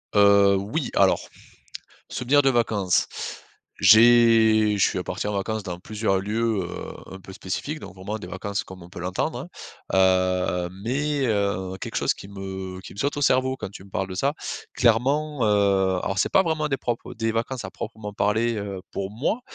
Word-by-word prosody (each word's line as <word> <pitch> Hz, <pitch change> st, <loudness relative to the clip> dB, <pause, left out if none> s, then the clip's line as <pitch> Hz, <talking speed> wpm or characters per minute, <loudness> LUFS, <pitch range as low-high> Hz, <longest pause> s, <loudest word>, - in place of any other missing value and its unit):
Heu, 100 Hz, -1 st, +6 dB
oui. 110 Hz, +10 st, -3 dB
Alors, -, -, +4 dB, 0.9 s
souvenir 140 Hz, +4 st, +2 dB
de 135 Hz, -, +4 dB
vacances, 110 Hz, -7 st, +1 dB, 0.7 s
j'ai 110 Hz, 0 st, +6 dB
je 100 Hz, -, +4 dB
suis 90 Hz, -, -3 dB
parti -, -, -3 dB
en 105 Hz, -, -2 dB
vacances 110 Hz, +2 st, -2 dB
dans 90 Hz, -3 st, -6 dB
plusieurs 105 Hz, +1 st, -1 dB
lieux, 110 Hz, 0 st, 0 dB
heu, 90 Hz, -, -7 dB
un 95 Hz, -, -10 dB
peu 95 Hz, -, -11 dB
spécifiques. 105 Hz, +10 st, -4 dB
Donc, -, -, -10 dB
vraiment 95 Hz, +3 st, -5 dB
des 100 Hz, -, -8 dB
vacances 100 Hz, +2 st, -4 dB
comme 95 Hz, -1 st, -11 dB
on 85 Hz, -, -12 dB
peut -, -, -10 dB
l'entendre, 90 Hz, +1 st, -2 dB
hein, -, -, -7 dB, 0.5 s
heu, 90 Hz, -1 st, +2 dB
mais, 140 Hz, +4 st, 0 dB
heu, 100 Hz, -4 st, -1 dB
quelque -, -, -6 dB
chose -, -, +2 dB
qui -, -, -11 dB
me 95 Hz, -1 st, -6 dB
qui -, -, -11 dB
me -, -, -14 dB
saute 140 Hz, +5 st, -1 dB
au 145 Hz, -, -2 dB
cerveau 130 Hz, -1 st, +2 dB
quand 95 Hz, -, -6 dB
tu 95 Hz, -, -11 dB
me 100 Hz, -, -17 dB
parles 95 Hz, 0 st, -2 dB
de 95 Hz, -, -6 dB
ça, 135 Hz, +9 st, +1 dB, 0.4 s
clairement, 135 Hz, +4 st, +2 dB
heu, 100 Hz, -3 st, +2 dB
alors, 100 Hz, -, -2 dB
c'est -, -, +1 dB
pas 190 Hz, -, +6 dB
vraiment 160 Hz, -3 st, -1 dB
des 135 Hz, -, 0 dB
propres 120 Hz, -3 st, -4 dB
des 115 Hz, 0 st, -1 dB
vacances 115 Hz, +3 st, -3 dB
à -, -, -6 dB
proprement 110 Hz, -2 st, -7 dB
parler, 110 Hz, +3 st, +1 dB
heu, 100 Hz, -2 st, -5 dB
pour 95 Hz, 0 st, -4 dB
moi. 135 Hz, -, -1 dB
105 Hz, 190 wpm, -24 LUFS, 95-120 Hz, 0.9 s, Heu